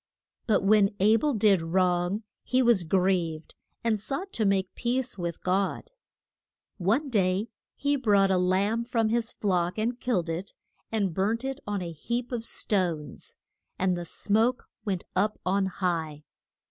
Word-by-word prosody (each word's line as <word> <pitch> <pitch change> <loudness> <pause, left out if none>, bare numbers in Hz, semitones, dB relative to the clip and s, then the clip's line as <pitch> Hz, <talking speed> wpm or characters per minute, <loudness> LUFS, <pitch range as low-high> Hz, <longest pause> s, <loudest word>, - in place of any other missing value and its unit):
But 210 -3 +3
when 205 0 +4
A 210 +3 +5
bel 295 +1 0
did 205 -4 +4
wrong 180 +4 +1 0.2
he 255 +1 +1
was 230 -7 +4
grieved, 175 -3 0 0.3
and 225 -2 +1
sought 290 - -4
to 220 - 0
make 195 -1 +1
peace 245 +1 -1
with 170 -3 -5
God. 190 +2 -1 0.9
One 225 - +1
day 195 +1 +1 0.3
he 285 0 0
brought 200 -6 +3
a 185 - +3
lamb 195 +5 +1
from 230 -2 0
his 230 0 0
flock, 180 -2 0
and 235 +3 -1
killed 195 -9 0
it, 170 +4 -4 0.4
and 200 -6 0
burnt 220 +7 0
it 270 +1 -3
on 205 -3 -2
a 170 - -5
heap 235 - -4
of 235 -2 -3
stones. 170 -11 -1 0.4
And 185 -1 +1
the 175 - -4
smoke 220 +8 +1 0.2
went 190 -4 -1
up 210 +3 +1
on 190 +1 +2
high. 165 -5 -2
200 Hz, 155 wpm, -27 LUFS, 180-230 Hz, 0.9 s, A